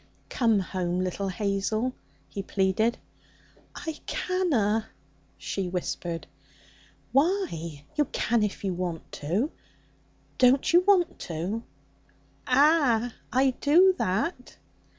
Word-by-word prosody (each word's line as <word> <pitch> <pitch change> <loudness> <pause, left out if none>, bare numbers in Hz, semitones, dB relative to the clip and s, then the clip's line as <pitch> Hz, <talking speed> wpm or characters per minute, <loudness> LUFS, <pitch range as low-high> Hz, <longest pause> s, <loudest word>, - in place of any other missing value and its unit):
'Come 230 -4 +2
home, 180 -1 -2
little 185 +2 -2
Hazel!' 210 +5 -1 0.3
he 195 +7 -5
pleaded. 195 +4 +1 0.8
'I 320 -3 -5
canna,' 235 - 0 0.5
she 190 -2 -3
whispered. 175 -1 -3 0.9
'Why? 270 - 0
You 300 -1 +2
can 235 -2 0
if 210 -1 -2
you 190 -2 0
want 175 -2 -4
to. 190 - -1 0.9
Don't 255 +5 +4
you 350 - +8
want 375 -4 +3
to?' 180 +7 -3 0.9
'Ah! 255 -4 +4 0.2
I 260 +3 +3
do 355 +6 +6
that.' 250 - -2
220 Hz, 100 wpm, -27 LUFS, 185-280 Hz, 0.9 s, you